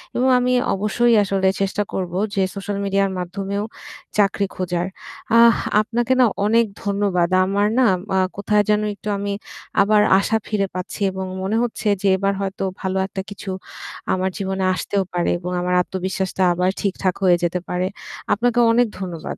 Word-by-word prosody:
এবং 255 +2 +2
আমি 250 0 +1 0.2
অবশ্যই 225 +4 +2
আসলে 195 -1 0
চেষ্টা 200 +1 0
করব, 180 -2 -3 0.2
যে 195 - +2
সোশ্যাল 200 0 -4
মিডিয়ার 195 0 +1
মাধ্যমেও 195 +3 -3 0.5
চাকরি 200 0 +2
খোঁজার। 180 -1 -2 0.5
আহ 235 -1 +7 0.3
আপনাকে 240 +3 0
না 255 - +7 0.2
অনেক 230 +2 +4 0.2
ধন্যবাদ। 200 -4 +1 0.2
আমার 200 +2 +1
না 255 - +5 0.5
কোথায় 210 0 +2
যেন 210 0 +3
একটু - - -19 0.2
আমি 200 0 -2 0.5
আবার 210 +1 +4 0.2
আশা 220 +3 +1
ফিরে 200 -2 0
পাচ্ছি 185 +3 -5
এবং 190 0 -4 0.2
মনে 195 +3 -1
হচ্ছে 225 -2 -3
যে 200 - +1
এবার 195 +1 +1
হয়তো 195 0 -3 0.2
ভালো 190 -1 -1
একটা 190 -1 -5
কিছু 205 -1 -8 0.6
আমার 185 0 0
জীবনে 190 -1 -2
আসতেও 195 +2 -1
পারে 175 -1 0
এবং 180 +1 -5
আমার 180 0 -1
আত্মবিশ্বাসটা 190 +1 -2
আবার 180 +1 +1
ঠিকঠাক 190 -2 -1
হয়ে 175 -2 +5
যেতে 175 +1 0
পারে। 180 +1 0 0.5
আপনাকে 240 +3 +1
অনেক 240 0 +3
ধন্যবাদ। 175 -4 -5
195 Hz, 160 wpm, -21 LUFS, 185-210 Hz, 0.6 s, আহ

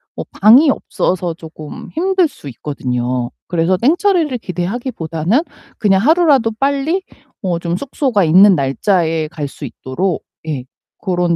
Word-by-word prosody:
어 - - -4
방이 245 +9 +5
없어서 180 -9 -1
쪼끔 155 -2 -10
힘들 370 +1 +2
수 150 - -13
있거든요. 125 -2 -3 0.2
그래서 175 +1 +1
땡처리를 320 - +2
기대하기 195 +7 -4
보다는 165 - 0 0.4
그냥 195 -3 +3
하루라도 290 - +4
빨리 280 +6 +1 0.4
어 180 -4 -1
좀 170 +1 -2
숙소가 260 -5 0
있는 185 +5 +7
날짜에 160 +2 0
갈 150 -2 -5
수 140 +1 -9
있도록 160 +8 -3 0.2
예 135 -5 -3 0.4
그런 175 -2 +1
185 Hz, 290 characters per minute, -17 LUFS, 160-265 Hz, 0.4 s, 있는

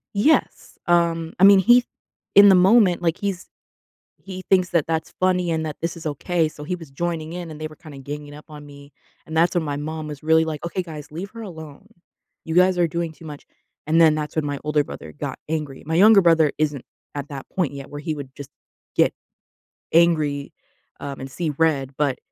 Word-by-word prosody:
Yes. 290 +11 +1
Um, 170 -1 +1
I 190 - +3
mean, 200 0 +8
he 240 +5 +5 0.5
in 200 0 +9
the 190 - +7
moment, 185 -1 +4
like, 170 0 0
he's 195 -3 -4 0.7
he 185 -1 -9
thinks 185 -2 +3
that 170 -4 +2
that's 160 0 -2
funny 180 -1 +1
and 160 -1 -1
that 150 -2 -5
this 170 0 -2
is 160 - -11
okay. 160 +3 0
So 150 -1 -11
he 180 +5 -3
was 165 -6 -12
joining 165 +1 -3
in, 175 -2 -6
and 155 - -10
they 155 - -4
were 155 - -15
kinda 155 -3 -12
ganging 145 +1 -8
up 150 - -13
on 150 -1 -11
me. 140 0 -14 0.3
And 160 - -7
that's 170 +3 +3
when 175 - +1
my 145 -2 -3
mom 155 +1 -5
was 150 -2 -8
really 160 +1 +3
like, 155 -2 -5
"Okay, 180 +2 -3
guys, 150 -4 -10
leave 185 +6 -7
her 230 0 -9
alone. 160 -2 -10 0.6
You 160 - -4
guys 185 0 +4
are 175 -1 +3
doing 170 0 -3
too 160 - -15
much." 150 -2 -9 0.4
And 165 +2 +3
then 160 -2 +6
that's 150 0 -4
when 155 - 0
my 145 -1 -3
older 150 -1 +1
brother - - -9
got 145 -2 -6
angry. 150 -4 -4
My 160 - -2
younger 205 +3 +7
brother 165 -4 +4
isn't 150 -4 -1 0.3
at 145 +1 -5
that 140 -2 -8
point 170 -7 -1
yet 140 -1 -9
where 145 - -7
he 160 0 -3
would 140 -3 -9
just 140 -1 -9 0.5
get - - +3 0.8
angry, 155 -4 +2 0.5
um, 140 -1 -6
and 135 0 -7
see 160 +3 -3
red, 140 -5 +1
but 140 -3 0
160 Hz, 215 wpm, -22 LUFS, 150-175 Hz, 0.8 s, in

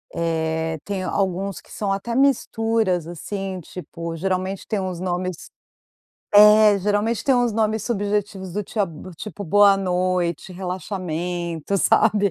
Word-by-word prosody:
eh, 160 -1 -1
tem 195 -2 -3
alguns 195 -1 -2
que - - -21
são 205 -2 -2
até 230 +4 -3
misturas 225 - +1
assim, 190 +2 -5
tipo 170 -1 -7
geralmente 185 +2 -2
tem 215 - -1
os 185 -2 -4
nomes, 180 -1 -3 0.8
é, 210 0 +7
geralmente 210 +3 0
tem 270 - +4
uns 245 -2 +2
nomes 220 0 0
subjetivos 205 -4 -2
do 210 +3 -2
tia 210 +2 -2 0.3
tipo 205 +2 -7
boa 200 +3 +5
noite, 180 -2 -1
relaxamento, 180 -2 -3
sabe, 200 +1 +3
195 Hz, 125 wpm, -22 LUFS, 180-210 Hz, 0.8 s, é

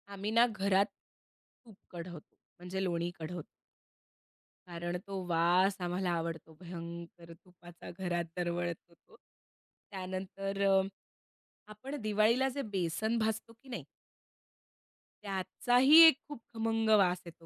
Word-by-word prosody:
आम्ही 200 +2 -3
ना 230 +2 +6
घरात, 200 -3 +2 0.8
तूप 220 -4 -15 0.2
कढवतो, 170 -3 -9 0.2
म्हणजे 180 +2 -4
लोणी 170 -2 -1
कढवतो. 165 +1 -5 1.2
कारण 175 0 -4
तो 195 -2 -4
वास 175 +3 +3
आम्हाला 180 +1 -1
आवडतो 165 -1 -4
भयंकर 170 -1 -9
तुपाचा 175 0 -14
घरात 175 -2 -1
दरवळतो 175 0 -3
तो. - - -23 0.8
त्यानंतर 195 +1 -4
अं, 195 0 +4 0.8
आपण 255 +7 -7
दिवाळीला 215 +5 +2
जे 280 - 0
बेसन 190 +6 0
भाजतो 220 +1 -2
की 240 +4 -20
नाही? 225 - -5 1.4
त्याचाही 245 - +4
एक 315 - +6
खूप 290 -5 -9
खमंग 225 -1 0
वास 180 -2 +2
येतो 165 -1 -13
185 Hz, 115 wpm, -32 LUFS, 175-215 Hz, 1.4 s, ना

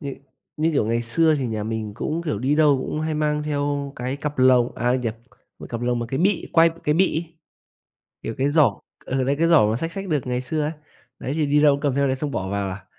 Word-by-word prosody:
như 140 -2 -5 0.4
như, 160 +2 +1
kiểu, 125 -7 +1
ngày 115 +1 0
xưa 155 +7 +3
thì 130 - -1
nhà 110 -2 -3
mình 110 -2 -4
cũng, 160 +9 -3
kiểu, 150 -12 -2
đi 135 +5 +1
đâu 150 -3 +4
cũng 155 - -3
hay 155 0 -2
mang 150 0 0
theo 145 -1 -2
cái 125 +2 -3
cặp 150 -1 -5
lồng 125 -1 +4
à, 120 +1 +1
nhập 120 -3 -2 0.4
cái - - -9
cặp 115 -1 -4
lồng 120 0 0
mà 120 - -3
cái 135 - -2
bị 190 +1 +1
quai 165 0 +6
của 165 +1 -10
cái 150 - +2
bị 185 +1 +2
ấy, 165 0 -26 0.9
kiểu, 115 - -4
cái 135 +2 +2
giỏ, 150 -1 +3 0.2
ừ, 130 0 -1
đấy 140 +2 +1
cái 165 0 +3
giỏ 160 -10 +6
mà 115 - 0
xách 165 +5 -4
xách 195 -1 -5
được 145 -6 -1
ngày 125 0 -1
xưa 155 +4 -2
ấy, 150 - -1 0.5
đấy 130 - -4
thì 155 -2 0
đi 145 +1 +3
đâu 145 -2 +6
cũng 140 - -4
cầm 145 -3 0
theo 140 0 +2
đấy 130 - 0
xong 145 +2 -3
bỏ 95 -7 -3
vào 100 -1 -2
à. 95 +1 -8
140 Hz, 270 wpm, -23 LUFS, 120-155 Hz, 0.9 s, quai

